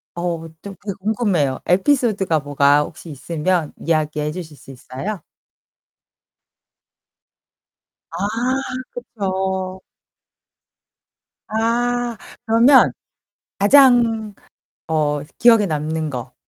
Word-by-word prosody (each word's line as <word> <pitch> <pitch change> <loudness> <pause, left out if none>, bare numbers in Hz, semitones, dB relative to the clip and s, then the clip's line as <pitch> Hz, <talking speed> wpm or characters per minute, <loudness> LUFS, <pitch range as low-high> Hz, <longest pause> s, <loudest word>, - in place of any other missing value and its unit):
어 170 -1 -3
좀 200 -1 -9
되게 200 -1 -4
궁금해요. 195 - 0
에피소드가 195 - +2
뭐가 145 0 +3
혹시 165 +2 -11
있으면 160 +3 -2
이야기해 155 -2 -1
주실 155 -3 -8
수 135 - -13
있어요? 135 +10 -7 2.9
아 165 - -6 0.8
그쵸. 190 -5 -3 1.7
아 235 +1 -1 0.3
그러면 235 +4 +5 0.7
가장 230 -2 +4 0.5
어 150 -2 0 0.2
기억에 230 -3 +6
남는 155 -1 -2
거. 125 -2 -7
185 Hz, 170 characters per minute, -20 LUFS, 155-225 Hz, 2.9 s, 기억에